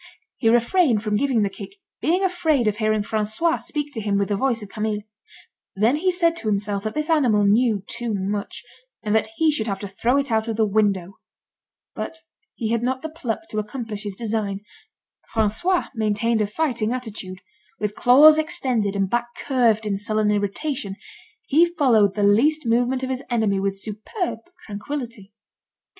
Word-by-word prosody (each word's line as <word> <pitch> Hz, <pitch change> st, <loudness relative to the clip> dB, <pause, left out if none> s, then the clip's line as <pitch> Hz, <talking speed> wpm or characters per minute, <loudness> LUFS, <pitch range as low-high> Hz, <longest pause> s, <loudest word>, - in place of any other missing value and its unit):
He 225 Hz, -, +2 dB
refrained 240 Hz, -, +3 dB
from 210 Hz, -1 st, 0 dB
giving 245 Hz, -2 st, +2 dB
the 200 Hz, -, 0 dB
kick, 385 Hz, -, -10 dB, 0.3 s
being 360 Hz, +4 st, +1 dB
afraid 325 Hz, -8 st, +1 dB
of 210 Hz, -1 st, 0 dB
hearing 215 Hz, -1 st, +1 dB
François 220 Hz, +11 st, 0 dB
speak 295 Hz, -1 st, -4 dB
to 225 Hz, -, -4 dB
him 205 Hz, -1 st, 0 dB
with 200 Hz, 0 st, 0 dB
the 205 Hz, -, +1 dB
voice 235 Hz, 0 st, 0 dB
of 205 Hz, -, -10 dB
Camille. 215 Hz, -1 st, -3 dB, 0.7 s
Then 225 Hz, +8 st, +3 dB
he 370 Hz, +4 st, +1 dB
said 340 Hz, -2 st, +2 dB
to 230 Hz, -, -6 dB
himself 200 Hz, 0 st, -1 dB
that 215 Hz, -, -3 dB
this 305 Hz, 0 st, -1 dB
animal 250 Hz, -11 st, +3 dB
knew 215 Hz, -1 st, +3 dB
too 235 Hz, -1 st, -3 dB
much, 200 Hz, +1 st, -3 dB, 0.4 s
and 210 Hz, -1 st, -1 dB
that 220 Hz, 0 st, +2 dB
he 320 Hz, +3 st, +3 dB
should 230 Hz, -7 st, 0 dB
have 195 Hz, -2 st, -1 dB
to 200 Hz, -, -4 dB
throw 235 Hz, +7 st, 0 dB
it 280 Hz, -3 st, -1 dB
out 220 Hz, 0 st, +1 dB
of 225 Hz, -1 st, -3 dB
the 220 Hz, -, +3 dB
window. 200 Hz, -3 st, 0 dB, 0.7 s
But 325 Hz, -, -5 dB, 0.4 s
he 225 Hz, -2 st, -2 dB
had 235 Hz, -1 st, +1 dB
not 260 Hz, +2 st, -2 dB
the 315 Hz, -, -3 dB
pluck 260 Hz, -7 st, -4 dB
to 215 Hz, -, -2 dB
accomplish 215 Hz, -1 st, -5 dB
his 205 Hz, -2 st, -5 dB
design. 210 Hz, -3 st, -2 dB, 0.7 s
François 285 Hz, -, +1 dB
maintained 220 Hz, 0 st, 0 dB
a 210 Hz, -, +1 dB
fighting 235 Hz, -3 st, -1 dB
attitude. 210 Hz, -7 st, -6 dB, 0.4 s
With 210 Hz, -1 st, -2 dB
claws 295 Hz, +8 st, +7 dB
extended, 255 Hz, -, -1 dB
and 195 Hz, -1 st, +1 dB
back 240 Hz, +4 st, -1 dB
curved 230 Hz, -5 st, +2 dB
in 200 Hz, -2 st, -1 dB
sullen 215 Hz, +1 st, 0 dB
irritation, 205 Hz, +1 st, -2 dB, 0.5 s
he 330 Hz, +2 st, +4 dB
followed 225 Hz, -, +4 dB
the 205 Hz, -, 0 dB
least 270 Hz, +10 st, +3 dB
movement 245 Hz, +3 st, +1 dB
of 260 Hz, -, -2 dB
his 260 Hz, 0 st, -3 dB
enemy 220 Hz, -5 st, +1 dB
with 195 Hz, 0 st, -1 dB
superb 220 Hz, -, -4 dB, 0.3 s
tranquillity. 215 Hz, -1 st, -6 dB
220 Hz, 180 wpm, -23 LUFS, 205-265 Hz, 0.7 s, claws